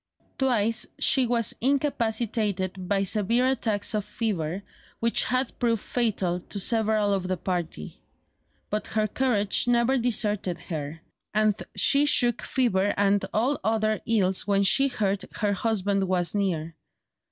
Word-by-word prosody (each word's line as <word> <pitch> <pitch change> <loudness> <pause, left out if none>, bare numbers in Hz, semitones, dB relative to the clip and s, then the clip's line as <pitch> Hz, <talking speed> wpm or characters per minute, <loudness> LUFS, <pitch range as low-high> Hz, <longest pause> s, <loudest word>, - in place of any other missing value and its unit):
Twice 230 -4 +1
she 265 -5 +3
was 235 -2 +2
incapacitated 220 - -1
by 200 -1 +2
severe 225 +5 +2
attacks 225 -6 0
of 210 -1 -1
fever, 190 -5 -3 0.4
which 230 0 +2
had 255 0 -1
proved 230 -3 0
fatal 200 -7 -1
to 200 +3 -5
several 215 -1 +2
of 190 -2 -2
the 185 0 -1
party; 170 - -4 0.7
but 210 +1 -2
her 215 -1 0
courage 215 -3 +1
never 245 +2 +3
deserted 210 -6 -1
her; 155 -1 -6 0.3
and 215 0 +3 0.2
she 285 +1 +4
shook 240 -4 +2
off - - -8
fever 205 -6 +1
and 200 0 +2
all 250 +7 0
other 215 -1 0
ills 195 -5 +1
when 200 -1 +2
she 275 +8 +4
heard 205 -6 -1
her 205 -2 0
husband 200 -2 0
was 180 -2 0
near. 170 -6 -2
210 Hz, 140 wpm, -26 LUFS, 195-235 Hz, 0.7 s, she